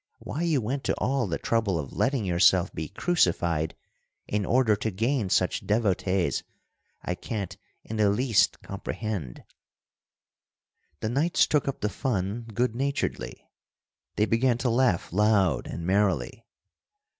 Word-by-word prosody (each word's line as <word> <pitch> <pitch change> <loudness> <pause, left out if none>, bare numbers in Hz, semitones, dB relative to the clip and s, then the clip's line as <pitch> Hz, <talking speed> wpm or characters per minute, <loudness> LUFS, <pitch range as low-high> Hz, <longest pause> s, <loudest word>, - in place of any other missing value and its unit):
Why 155 - -5
you 160 -6 +1
went 130 +5 -3
to - - +1
all 130 -3 0
the 85 - -2
trouble 110 -6 0
of 70 -4 -5
letting 130 -5 0
yourself 90 +1 +3
be 80 0 -4
crucified 85 - +1 0.5
in 105 -2 -1
order 120 -3 +3
to 110 - -2
gain 115 +2 0
such - - +1
devotees, 100 -4 +1 0.6
I 90 - -2
can't 100 +1 -5 0.3
in 110 - -6
the 105 -2 +4
least 115 +1 +2
comprehend.'" 100 - -5 1.6
The 110 - -1
knights 155 +9 +3
took 150 -2 +1
up 135 - -3
the 105 - 0
fun 110 -2 -2
good 120 +2 0
naturedly. 140 +2 -3 0.7
They 105 - +3
began 115 +2 +2
to 120 - +3
laugh 115 -10 +1
loud 100 -7 +2
and 85 - -5
merrily. 95 - 0
105 Hz, 135 wpm, -27 LUFS, 95-125 Hz, 1.6 s, the